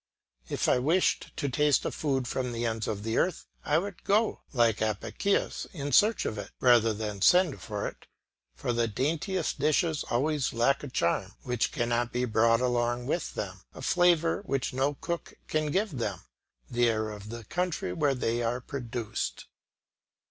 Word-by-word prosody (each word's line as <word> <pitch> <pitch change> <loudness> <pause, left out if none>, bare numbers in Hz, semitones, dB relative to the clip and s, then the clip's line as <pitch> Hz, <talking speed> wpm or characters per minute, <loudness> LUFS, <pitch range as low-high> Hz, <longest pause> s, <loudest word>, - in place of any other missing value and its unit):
If - - 0
I - - +4
wished 160 +8 +1
to 140 - -1
taste 145 +2 +2
a - - 0
food 135 -4 -1
from 125 -1 -2
the 115 +1 -2
ends 110 -1 -1
of 105 -2 -3
the 115 +1 0
earth, 180 - 0 0.2
I 150 - +2
would 195 +2 -4
go, 215 +2 +2
like 115 -5 +2
Apicius, 110 - -1
in 145 -4 -4
search 215 - +4
of 110 - -2
it, - - -6
rather 120 -3 +5
than 105 -2 -4
send 180 - +4
for 105 -2 -3
it; - - -10 0.5
for 120 - -2
the 120 0 +1
daintiest 155 - -1
dishes 155 +2 +2
always 145 +3 0
lack 120 +4 +2
a - - -4
charm 95 -4 0
which 125 -2 0
cannot 120 0 0
be 125 +1 0
brought 115 +1 +3
along 120 -1 0
with 160 +6 -2
them, - - -5
a - - -9
flavour 175 -1 +3
which 135 -1 -1
no 135 +3 +1
cook 170 +2 -5
can 155 -1 0
give 195 +6 0
them 105 - -3 0.5
the 120 0 +2
air 110 -1 -1
of 105 0 -9
the 115 0 -7
country 175 - -2
where 140 +7 +1
they 120 -1 0
are 120 +1 0
produced. 120 - -4
125 Hz, 175 wpm, -29 LUFS, 115-155 Hz, 0.5 s, rather